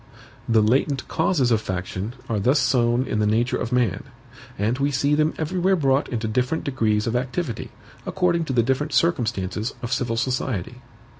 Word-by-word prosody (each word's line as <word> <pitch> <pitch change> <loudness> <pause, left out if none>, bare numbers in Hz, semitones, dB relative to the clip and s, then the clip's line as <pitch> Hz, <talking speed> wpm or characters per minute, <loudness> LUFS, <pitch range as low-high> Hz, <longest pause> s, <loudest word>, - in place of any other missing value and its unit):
The 110 -2 +4
latent 135 +4 +1
causes 160 -7 +1
of 110 -2 +3
faction 95 +4 -4
are 110 -2 -1
thus 130 +9 +3
sown 125 -2 +2
in 110 - -2
the 105 - +2
nature 115 +3 +1
of 115 - -4
man; 125 -2 0 0.5
and 110 +6 0
we 140 +1 +2
see 140 +1 +1
them 155 +1 +2
everywhere 180 +4 +1
brought 135 -4 +1
into 110 -2 -2
different 125 +7 0
degrees 110 -6 0
of 115 - -1
activity, 130 +1 -3 0.3
according 175 -2 0
to 135 - -3
the 120 -2 +3
different 135 +4 -1
circumstances 115 - 0
of 120 +1 -2
civil 125 -3 -1
society. 125 -6 -2
125 Hz, 170 wpm, -23 LUFS, 110-140 Hz, 0.5 s, The